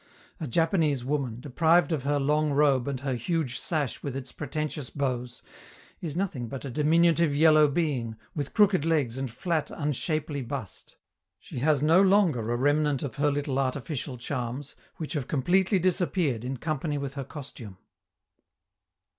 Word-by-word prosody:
A 155 - -4
Japanese 155 - +1
woman, 135 -5 -2
deprived 160 +5 +3
of 145 -5 -1
her 145 0 +1
long 150 +1 +1
robe 140 -3 +3
and 135 -2 -3
her 135 -2 -1
huge 125 0 -1
sash 150 -7 -2
with 140 -3 -4
its 135 -1 -5
pretentious 150 -1 -4
bows, 125 -4 -3 0.6
is 155 -4 -4
nothing 170 -10 -2
but 135 +4 -7
a 135 - -5
diminutive 160 +2 +3
yellow 155 0 +6
being, 140 -7 -1 0.2
with 145 -3 -4
crooked 205 -7 +4
legs 145 -7 0
and 135 -1 -2
flat, 160 +6 -2
unshapely 150 0 -2
bust; 120 -4 -7 0.4
she - - -8
has 145 +1 +2
no 165 +5 +6
longer 180 - +3
a 120 - +1
remnant 145 +1 +2
of 135 -6 -5
her 145 +1 +2
little 140 -1 -1
artificial 135 0 -3
charms, 125 +2 -4 0.2
which 155 - -5
have 145 -6 -2
completely 185 - +2
disappeared 175 - +1
in 130 +1 -3
company 150 +1 -2
with 140 -1 -4
her 140 -1 -4
costume. 130 - -9
145 Hz, 155 wpm, -27 LUFS, 130-160 Hz, 0.6 s, yellow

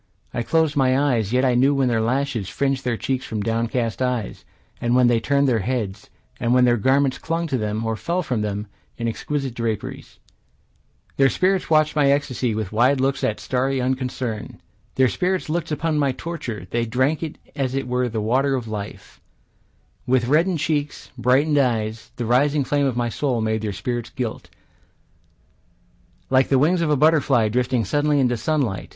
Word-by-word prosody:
I 120 - -1
closed 160 +4 +1
my 130 -2 +3
eyes, 120 -7 +1
yet 130 +2 +2
I 125 - +3
knew 135 +4 +3
when 135 -2 +2
their 115 -2 +1
lashes 120 -3 -1
Fringed 135 +3 -1
their 120 -2 -1
cheeks 130 +2 -2
from 105 -2 -4
downcast 115 +1 -1
eyes, 125 -5 -2 0.4
And 120 +1 +1
when 125 0 +5
they 120 -1 +3
turned 140 +4 +1
their 120 -4 +2
heads; 105 -3 -3 0.3
And 120 -1 +1
when 125 0 +5
their 120 -1 +4
garments 130 +3 +2
clung 165 +1 -2
to 140 -5 -1
them, 105 +1 -2
Or 110 0 -1
fell 175 +10 -2
from 125 -8 -2
them, 105 0 -3 0.3
in 115 - -2
exquisite 135 +3 -3
draperies. 115 -3 -4 1.0
Their 135 -1 +5
spirits 185 +4 +1
watched 155 -1 +3
my 145 -2 +3
ecstasy 130 -5 0
With 110 -3 -3
wide 125 +5 +3
looks 135 +1 0
of 110 - -1
starry 130 +1 -1
unconcern. 125 -3 -3 0.4
Their 130 0 +4
spirits 185 +5 -1
looked 165 -1 -2
upon 155 +1 0
my 140 -2 +1
torture; 130 - -6
They 120 0 0
drank 130 +6 +1
it 160 -2 -5 0.2
as 135 -3 -1
it 135 -2 -2
were 125 0 0
the 110 -1 -3
water 135 +5 +1
of 120 -3 -4
life; 105 -1 -7 0.9
With 125 -1 +2
reddened 165 +5 +3
cheeks, 150 -1 -2
brightened 135 +5 +2
eyes, 115 -4 -1
The 120 - -3
rising 140 +5 +2
flame 140 +1 +1
of 125 -3 -2
my 120 -1 0
soul 125 +1 -1
made 110 0 -1
their 110 -1 -2
spirits 115 +4 -4
gilt, 120 -4 -5 1.8
Like 130 0 +4
the 135 - +3
wings 170 +6 +3
of 165 - +1
a 150 - +3
butterfly 140 -7 +3
drifting 125 0 0
suddenly 145 +6 +1
into 125 -2 +2
sunlight. 125 - -1
130 Hz, 180 wpm, -22 LUFS, 115-140 Hz, 1.8 s, when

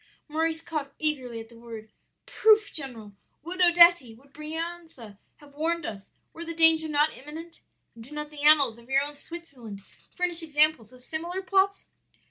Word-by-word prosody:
"Maurice 320 +1 -1
caught 300 -4 -5
eagerly 260 -7 -2
at 225 - -9
the 230 -1 -16
word. 225 -2 -10 0.3
'Proof, 435 -4 +3
general! 235 -8 -5 0.3
would 360 +3 -5
Odetti, 345 -8 +6
would 275 +3 -23
Brianza 315 - -7 0.2
have 290 -1 -19
warned 325 +2 -1
us, 200 -2 -7 0.2
were 335 - -8
the 335 0 -5
danger 325 -1 +4
not 295 +1 +2
imminent? 320 +5 -10 0.3
And 230 - -12
do 240 - -14
not 300 0 -6
the 295 -1 -9
annals 285 -6 +5
of 235 +2 -19
your 270 +1 +3
own 290 +1 -2
Switzerland 280 -10 -9 0.3
furnish 355 -2 -1
examples 300 -7 +2
of 255 0 -14
similar 340 +7 -4
plots?' 395 +1 +1
300 Hz, 165 wpm, -27 LUFS, 255-335 Hz, 0.3 s, Odetti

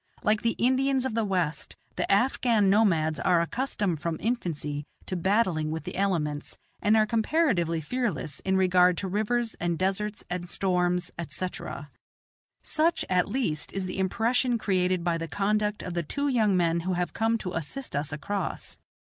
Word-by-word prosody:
Like 210 0 +2
the 230 - +1
Indians 260 +1 +2
of 260 - -2
the 225 0 +1
West, 180 -6 -1 0.2
the - - -1
Afghan 225 -2 +3
nomads 165 -7 +3
are 175 -2 +3
accustomed 200 - -1
from 165 +1 -2
infancy 150 -10 -2 0.2
to 185 - -3
battling 185 -4 +1
with 160 +1 -3
the - - -6
elements, 155 -7 -1 0.2
and 215 +2 +4
are 215 - +5
comparatively 220 - +1
fearless 205 - -2
in 190 0 0
regard 180 -1 +4
to 195 - -2
rivers 220 +4 0
and 170 -1 -1
deserts 195 +3 -1
and 180 0 -4
storms, 180 -2 0
etc. 160 -4 -5 0.7
Such, 325 +2 +1
at 180 +1 +2
least, 205 - -1
is 195 -1 -2
the 185 +1 -4
impression 235 +5 +1
created 185 -4 +1
by 170 -1 0
the 165 - -4
conduct 210 +2 0
of 180 - -5
the 170 - 0
two 285 - -2
young 220 -8 +3
men 170 -1 +2
who 185 +2 -2
have 175 0 -2
come 225 +1 +1
to 185 -4 -5
assist 165 - -5
us 145 +2 -1
across. 195 +7 -4
190 Hz, 165 wpm, -27 LUFS, 170-225 Hz, 0.7 s, are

